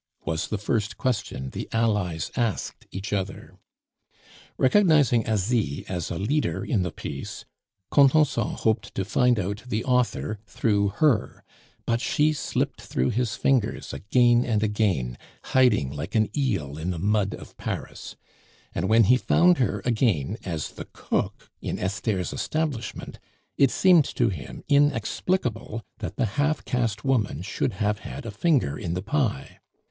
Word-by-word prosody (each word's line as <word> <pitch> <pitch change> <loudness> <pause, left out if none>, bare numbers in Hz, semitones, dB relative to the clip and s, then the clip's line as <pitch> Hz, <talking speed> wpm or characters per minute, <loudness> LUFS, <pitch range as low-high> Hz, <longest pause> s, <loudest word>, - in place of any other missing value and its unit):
was 80 0 -1
the 110 - -2
first 105 +1 -1
question 100 - -2
the - - -6
allies 105 -8 0
asked 115 -5 -2
each 95 +3 -5
other. 100 -1 -4 1.0
Recognizing 145 - +4
Asie 105 - 0
as 90 -3 -3
a 85 - -3
leader 140 - -1
in 115 -9 +1
the 90 -2 -2
piece, - - -7 0.5
Contenson 140 -4 +4
hoped 110 -2 -1
to 95 - -1
find 125 +3 +3
out 100 +3 -3
the 115 -2 -2
author 125 -4 0
through 100 -2 +1
her; 110 +4 +1 0.4
but 115 0 0
she 150 +6 +2
slipped 150 - -2
through 65 +1 -1
his 120 -1 -1
fingers 130 -6 0
again 120 +3 +3
and 110 -3 0
again, 95 - 0 0.2
hiding 125 - +3
like 75 +7 -6
an 110 -1 +2
eel 95 - -1
in 85 +3 -3
the 90 - -2
mud 100 +2 +1
of - - -13
Paris; - - -6 0.6
and 90 +3 -1
when 115 +1 +6
he 125 +5 +5
found 175 +6 +4
her 105 -5 0
again 110 - +1
as 80 -5 -4
the - - -8
cook - - -3
in - - -3
Esther's 95 -1 -2
establishment, 150 -7 -3 0.4
it 140 - +4
seemed 175 -3 +5
to 120 -2 +1
him 75 -10 -7
inexplicable 130 - +1 0.2
that 110 - -5
the 130 - +1 0.2
half 155 +2 0
caste 115 -4 -1
woman 110 - +1
should 110 - -2
have 105 +1 -1
had - - -8
a 115 - -4
finger 125 - +1
in 85 0 -3
the 90 - -3
pie. 135 +2 -1
110 Hz, 150 wpm, -25 LUFS, 95-125 Hz, 1.0 s, when